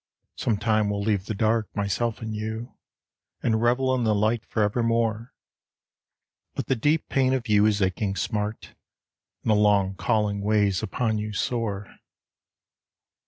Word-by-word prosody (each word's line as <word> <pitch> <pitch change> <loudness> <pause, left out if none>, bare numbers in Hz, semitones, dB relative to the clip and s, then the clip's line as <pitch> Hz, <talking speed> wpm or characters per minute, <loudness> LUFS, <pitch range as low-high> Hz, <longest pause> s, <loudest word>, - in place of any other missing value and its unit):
Sometime 110 -1 +1
we'll 100 0 -2
leave 100 -2 0
the 110 - -2
dark, 110 +1 +1
myself 100 +3 -1
and 110 -1 -4
you, 110 +3 -5 0.7
And 110 -1 +1
revel 130 +2 +2
in 125 -2 0
the 110 -2 +2
light 110 +2 +1
for 110 - 0
evermore. 115 +1 0 1.2
But - - -2
the 135 - +1
deep 150 +6 +1
pain 130 -1 +2
of 125 -2 -2
you 105 0 +4
is 105 -2 +2
aching 95 +1 -1
smart, 105 +1 -3 0.7
And 110 - +1
a - - +6
long 105 -2 +3
calling 105 0 0
weighs 100 -2 +2
upon 110 +1 -1
you 105 0 -4
sore. 105 -3 -3
110 Hz, 145 wpm, -25 LUFS, 105-115 Hz, 1.2 s, a